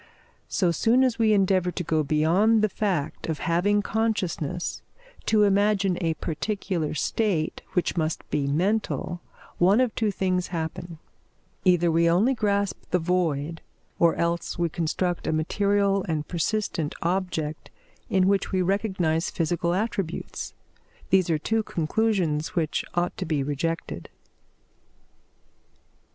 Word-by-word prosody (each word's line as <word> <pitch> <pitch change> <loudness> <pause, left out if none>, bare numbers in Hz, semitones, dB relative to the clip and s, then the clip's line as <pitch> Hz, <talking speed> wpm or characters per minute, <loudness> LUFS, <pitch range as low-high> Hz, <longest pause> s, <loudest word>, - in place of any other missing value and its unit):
So 180 -4 +1
soon 230 - +3
as 245 -3 +1
we 220 -1 +4
endeavour 190 -3 +3
to 180 0 -4
go 160 -1 +1
beyond 170 +10 +3
the 215 - +3
fact 185 -8 -2
of 160 - -1
having 195 +7 +1
consciousness 185 -7 -2 0.5
to 215 -1 +4
imagine 200 -2 +2
a 165 -2 0
particular 175 -2 -2
state 175 -3 0
which 180 - 0
must 160 -2 -2
be 140 -2 0
mental, 175 +2 -1 0.4
one 190 +6 +5
of 255 -3 +2
two 220 -2 0
things 185 -2 0
happen; 165 0 -5 0.7
either 175 -2 +4
we 165 +1 +3
only 200 +10 +3
grasp 200 -4 0
the 180 - +2
void, 165 -3 -1 0.4
or 170 -1 +4
else 170 0 -1
we 170 -1 +1
construct 175 +2 -2
a - - +2
material 200 +4 +1
and 155 -2 -1
persistent 175 -3 -1
object 170 -4 -2 0.4
in 190 -1 +3
which 200 -1 +1
we 185 -1 +1
recognise 185 -4 0
psychical 170 +1 -1
attributes. 195 -4 -3 0.6
These 190 -2 +4
are 160 - +3
two 220 +8 0
conclusions 170 -4 0
which 160 -3 0
ought 175 0 0
to - - -3
be 150 -3 0
rejected. 155 +4 -3
180 Hz, 130 wpm, -25 LUFS, 165-200 Hz, 0.7 s, one